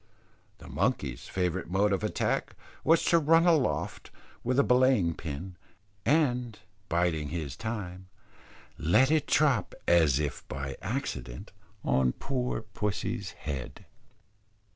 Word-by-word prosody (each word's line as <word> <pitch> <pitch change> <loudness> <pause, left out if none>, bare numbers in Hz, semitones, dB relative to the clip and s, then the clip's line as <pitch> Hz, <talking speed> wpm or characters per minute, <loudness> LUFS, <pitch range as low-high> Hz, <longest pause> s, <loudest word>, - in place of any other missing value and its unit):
The - - -13
monkey's 85 - -1
favourite 90 -1 -2
mode 100 +2 +2
of 95 - -1
attack, - - -1 0.3
was 165 +1 +4
to 170 - +5
run 165 +2 +4
aloft 160 -6 +1 0.3
with 125 +2 0
a 140 - +6
belaying 125 -10 +3
pin, 85 +4 -7 0.5
and 125 -7 +2 0.3
biding 85 -3 +1
his 75 -4 -4
time, 95 -5 -5 0.7
let 105 - +4
it 155 -2 +2
drop 140 -10 +2
as 80 -6 +5
if 75 -1 -3
by 70 0 -5
accident 60 0 -4 0.3
on 65 -1 +2
poor 125 -4 -2
pussy's 105 -1 -3
head. 65 -4 -6
95 Hz, 120 wpm, -29 LUFS, 80-125 Hz, 0.7 s, a